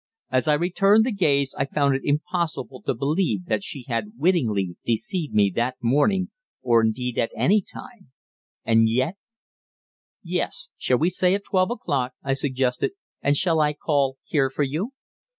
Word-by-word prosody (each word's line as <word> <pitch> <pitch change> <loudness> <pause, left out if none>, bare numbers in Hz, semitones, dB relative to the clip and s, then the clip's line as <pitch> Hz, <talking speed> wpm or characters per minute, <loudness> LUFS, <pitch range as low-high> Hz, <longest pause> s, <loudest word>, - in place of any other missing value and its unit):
As 130 +3 +1
I 150 - +4
returned 195 +6 +3
the 255 - 0
gaze 140 -9 +1
I 135 - +2
found 140 -1 +1
it 135 - -1
impossible 150 -3 -2
to - - +1
believe 140 - 0
that 110 0 0
she 130 +4 -6
had 115 -4 -3
wittingly 115 - +1
deceived 150 - -1
me 100 -3 +3
that 125 +2 0
morning, 150 - +1 0.3
or 115 -2 +4
indeed 125 +2 -1
at 115 - +1
any 205 +4 +3
time, 205 - -11 0.6
and 115 0 +4
yet 130 - 0 1.1
"Yes. - - -3
Shall 125 - +1
we 165 +6 +1
say 180 +1 +2
at 200 - -4
twelve 185 0 +1
o'clock?" 135 - -2
I 135 - 0
suggested. 130 - 0 0.3
"And 145 +1 +2
shall 165 -2 +2
I 150 -1 +2
call 140 -3 0
here 135 -3 +1
for 140 +2 -1
you?" 160 - -3
140 Hz, 165 wpm, -24 LUFS, 125-175 Hz, 1.1 s, I